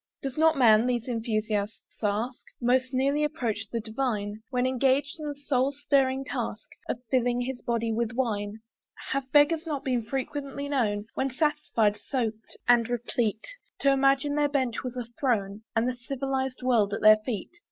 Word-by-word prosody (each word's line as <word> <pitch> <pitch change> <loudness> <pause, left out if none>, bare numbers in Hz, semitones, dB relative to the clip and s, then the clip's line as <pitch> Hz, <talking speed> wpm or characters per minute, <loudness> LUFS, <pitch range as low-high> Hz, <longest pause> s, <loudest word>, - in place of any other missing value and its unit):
Does 270 -2 -3
not 320 -1 +4
man, 225 -2 +6
these 245 -1 -1
enthusiasts 215 -3 -2
ask, 220 +4 -1 0.2
Most 255 +1 +2
nearly 275 +3 +1
approach 230 -8 -2
the 235 - -1
divine, 220 -2 -2
When 250 -1 0
engaged 270 +4 +1
in 305 - -5
the 290 - -4
soul 275 -2 0
stirring 270 -2 +1
task - - -4 0.2
Of 245 - -3
filling 245 -1 +2
his 250 0 -4
body 230 -1 -1
with 235 +1 -1
wine? 215 -4 -2 0.5
Have 275 0 0
not 260 - -39
beggars 310 +3 +4 0.2
been 250 -3 0
frequently 275 +3 -4
known, 215 -7 0
When 270 - 0
satisfied, 260 -7 +1
soaked, 225 -4 -4
and 240 -2 +5
replete, 235 -2 -1 0.4
To 275 - +5
imagine 275 +1 +3
their 295 0 +2
bench 260 -5 0
was 255 0 -5
a 245 - -3
throne 210 -6 0
And 225 +2 +2
the 255 - -1
civilised 265 +1 -3
world 220 -5 +3
at - - -6
their 215 0 +8
feet? 215 -2 -5
250 Hz, 165 wpm, -27 LUFS, 225-275 Hz, 0.5 s, their